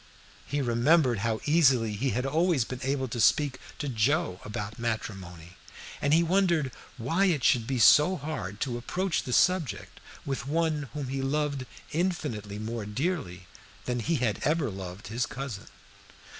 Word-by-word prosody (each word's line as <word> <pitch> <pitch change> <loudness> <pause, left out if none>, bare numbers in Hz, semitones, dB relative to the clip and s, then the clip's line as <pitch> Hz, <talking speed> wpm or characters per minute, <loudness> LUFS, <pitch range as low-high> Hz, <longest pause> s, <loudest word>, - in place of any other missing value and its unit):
He 145 -1 -1
remembered 125 +1 +3
how 110 +1 -1
easily 130 -8 +4
he 125 +7 -1
had 125 +1 -1
always 160 0 +2
been 130 +2 -6
able 135 0 -1
to 120 0 -5
speak 135 +3 +3 0.2
to 150 - -4
Joe 130 - +1
about 105 +2 -5
matrimony, 95 -7 -5 0.4
and 145 - +1
he 165 +2 +5
wondered 170 -6 +2 0.3
why 165 +12 +1
it 160 -9 +1
should 115 -2 +3
be 135 - -1
so 150 - +6
hard 115 - -5
to 120 -3 -1
approach 180 +8 -1
the 125 - -6
subject 155 - +1 0.3
with 135 -1 -3
one 155 -2 0
whom 140 -3 -4
he 135 0 -2
loved 140 -1 -1 0.2
infinitely 145 - -2
more 110 0 -4
dearly 115 - -3 0.4
than 125 -1 -1
he 165 +9 0
had 120 -7 0
ever 150 -5 +1
loved 95 0 -8
his 120 +3 -1
cousin. 125 -7 -6
130 Hz, 155 wpm, -28 LUFS, 110-150 Hz, 0.4 s, so